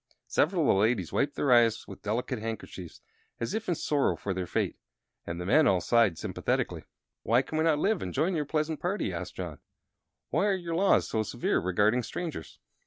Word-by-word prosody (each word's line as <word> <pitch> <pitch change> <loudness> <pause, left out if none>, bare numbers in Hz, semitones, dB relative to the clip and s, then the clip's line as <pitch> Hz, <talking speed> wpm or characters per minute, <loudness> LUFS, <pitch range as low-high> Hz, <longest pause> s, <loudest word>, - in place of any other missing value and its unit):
Several - - +1
of - - +2
the - - +6
ladies 105 -6 +1
wiped 145 +1 0
their 140 - +1
eyes 115 -2 +3
with - - -10
delicate 120 +4 -2
handkerchiefs, 110 -6 -7 0.4
as 115 - -3
if 220 -2 -3
in 175 - +2
sorrow 145 -2 +1
for 100 - -3
their 90 -1 -3
fate, - - -1 0.5
and 85 +1 -4
the 90 - -4
men 155 +11 +5
all 95 -2 +4
sighed 110 -2 +3
sympathetically. - - -2 0.4
"Why 120 +5 +3
can 145 - -7
we - - +3
not 160 -2 +3
live, 195 +4 +1
and 90 - -4
join 160 - +1
your 150 -2 -1
pleasant 155 +1 -1
party?" 185 +4 -2
asked - - -6
John. - - -6 0.7
"Why - - +2
are 200 - +2
your 175 -3 -4
laws 190 +4 +3
so 110 - 0
severe 110 - 0
regarding 105 +7 +2
strangers?" 155 - -6
125 Hz, 200 wpm, -29 LUFS, 105-160 Hz, 0.7 s, the